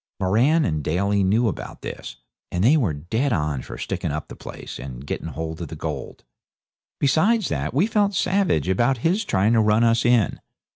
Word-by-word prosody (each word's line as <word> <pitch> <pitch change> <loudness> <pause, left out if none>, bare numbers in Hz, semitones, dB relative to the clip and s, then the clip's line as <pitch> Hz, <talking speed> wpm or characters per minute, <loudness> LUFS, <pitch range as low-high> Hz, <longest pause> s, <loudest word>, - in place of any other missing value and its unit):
Moran 125 - +3
and 75 -3 -1
Daly 100 +6 +1
knew 110 +5 +2
about 105 - -5
this, - - -7 0.4
and 90 +1 -1
they 130 +8 +6
were 120 - +2
dead 110 - -2
on 75 - -1
for - - -9
sticking - - -3
up 75 +1 -5
the - - -8
place - - -9
and 65 0 -8
getting 75 - -4
hold 80 +2 -5
of 85 - -4
the - - -8
gold. - - -6 0.8
Besides 190 +10 +2
that, 70 0 -2
we 150 +9 +2
felt 205 -2 +1
savage 180 - +1
about 120 +8 +2
his 190 +7 +2
trying 105 - +2
to 115 - +4
run 105 +1 +3
us 115 0 +3
in. 120 -5 +2
105 Hz, 190 wpm, -23 LUFS, -, 0.8 s, they